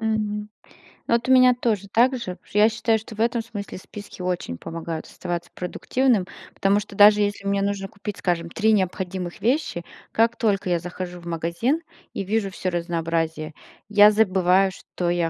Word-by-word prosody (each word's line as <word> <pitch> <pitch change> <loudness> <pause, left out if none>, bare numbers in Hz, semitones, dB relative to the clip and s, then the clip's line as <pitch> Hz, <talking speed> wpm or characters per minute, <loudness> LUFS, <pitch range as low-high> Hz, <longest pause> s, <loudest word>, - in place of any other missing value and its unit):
Мгм. 210 -1 -2 0.6
Ну, - - +1
вот 235 +1 +1
у 260 - +3
меня 255 -1 +7
тоже 220 -5 -1
так 250 +3 +4
же, 235 -7 -4
потому - - -29
что - - -4
я 215 +1 +7
считаю, 225 0 +1
что 220 +1 -11
в - - -14
этом 235 +1 +1
смысле 210 -4 -7
списки 200 +1 -10
очень 180 - -3
помогают 165 - -6
оставаться 175 -1 -5
продуктивным, 225 +4 0 0.3
потому 200 +1 +2
что 205 -1 -9
даже 210 +1 +7
если 205 -1 -1
мне 200 0 +1
нужно 200 -1 -1
купить, 205 0 -7
скажем, 170 -2 -1
3 220 +4 +2
необходимых 185 -2 -2
вещи, 240 - 0 0.3
как 230 +1 +2
только 205 -4 0
я 175 -1 +2
захожу 180 +1 -6
в 170 - -15
магазин 170 - -1 0.3
и 195 - -3
вижу 205 0 0
всё 185 0 -3
разнообразие, 165 -2 -2 0.4
я 210 0 +8
забываю, 190 -3 +3
что 175 -1 -4
я 175 -1 +1
200 Hz, 180 wpm, -23 LUFS, 175-220 Hz, 0.6 s, я